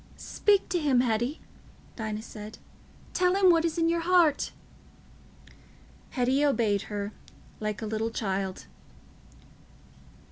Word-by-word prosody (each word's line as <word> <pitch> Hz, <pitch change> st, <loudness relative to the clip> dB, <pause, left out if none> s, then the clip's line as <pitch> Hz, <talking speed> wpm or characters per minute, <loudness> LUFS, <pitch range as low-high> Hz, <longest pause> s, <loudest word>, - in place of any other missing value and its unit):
"Speak 405 Hz, -2 st, +1 dB
to 350 Hz, 0 st, +1 dB
him, 275 Hz, -5 st, +3 dB
Hetty," 240 Hz, +4 st, -1 dB, 0.5 s
Dinah 215 Hz, -1 st, -4 dB
said; 215 Hz, -1 st, -9 dB, 0.6 s
"tell 360 Hz, 0 st, +2 dB
him 385 Hz, -2 st, +6 dB
what 330 Hz, -1 st, +3 dB
is 335 Hz, 0 st, -1 dB
in 330 Hz, -1 st, +2 dB
your 335 Hz, 0 st, +2 dB
heart." 335 Hz, -4 st, +3 dB, 1.6 s
Hetty 260 Hz, +2 st, +1 dB
obeyed 225 Hz, -8 st, +2 dB
her, 205 Hz, -1 st, -3 dB, 0.5 s
like 215 Hz, 0 st, -3 dB
a -, -, -2 dB
little 220 Hz, +1 st, -1 dB
child. 195 Hz, -4 st, -3 dB
245 Hz, 115 wpm, -28 LUFS, 215-330 Hz, 1.6 s, him